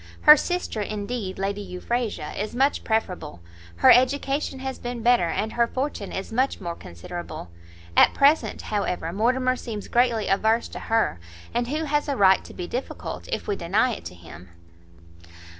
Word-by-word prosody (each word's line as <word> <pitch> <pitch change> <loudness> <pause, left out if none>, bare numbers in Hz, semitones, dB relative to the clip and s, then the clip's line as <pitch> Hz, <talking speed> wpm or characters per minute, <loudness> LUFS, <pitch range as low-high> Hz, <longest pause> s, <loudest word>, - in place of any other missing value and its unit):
her 300 - +10
sister, 355 - -2
indeed, 205 -1 -4
Lady 200 +1 -2
Euphrasia, 200 -2 -3
is 210 +3 -4
much 270 +3 +2
preferable, 180 - -2 0.4
her 85 - +6
education 275 +2 +2
has 265 0 -5
been 240 -1 -5
better, 240 -7 +4
and 215 +6 -2
her 235 0 +2
fortune 260 -5 -3
is 195 +3 -5
much 260 +4 +1
more 175 -4 -4
considerable. 90 - -8 0.4
At - - +6
present, 280 -6 +3
however, 180 -5 -2
Mortimer 255 +5 +1
seems 220 -5 -6
greatly 240 -3 +2
averse 220 +4 +2
to - - -7
her, 225 - 0 0.3
and 240 0 0
who 305 +5 -2
has 295 -1 0
a 280 -2 -1
right 190 -1 +5
to - - -11
be 180 - -4
difficult, 250 +9 -5
if - - -3
we 205 - 0
deny 205 +8 +1
it - - -8
to 90 +1 -8
him?" 85 0 -13
225 Hz, 165 wpm, -24 LUFS, 190-255 Hz, 0.4 s, her